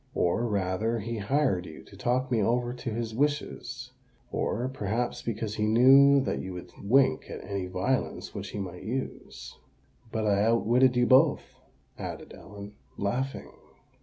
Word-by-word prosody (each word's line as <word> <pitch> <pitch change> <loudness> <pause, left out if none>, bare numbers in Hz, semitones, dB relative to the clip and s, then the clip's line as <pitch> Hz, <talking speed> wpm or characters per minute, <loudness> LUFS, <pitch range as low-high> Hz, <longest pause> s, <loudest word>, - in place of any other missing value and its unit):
"Or 115 +7 +1
rather, 105 +2 0
he 115 +1 -4
hired 100 -5 +1
you 80 - -11
to - - -16
talk 130 +2 -1
me 115 -3 +2
over 120 +3 +1
to 120 -1 -5
his 115 0 -3
wishes—or, 130 -2 -3
perhaps, 120 -1 -2
because 110 -2 -3
he 105 0 0
knew 135 +5 +7
that - - -2
you 95 - -6
would 90 0 -9
wink 130 +7 +3
at - - -7
any 100 -2 -4
violence 95 +8 -2
which - - -6
he - - -7
might 90 -3 -6
use. 130 +4 -6 0.5
But 110 -1 -1
I 100 -1 +3
outwitted 120 +3 +3
you 125 0 +3
both," 135 +5 +3 0.4
added - - -7
Ellen, 100 +1 -11 0.2
laughing. 125 +7 -3
115 Hz, 150 wpm, -28 LUFS, 100-130 Hz, 0.5 s, knew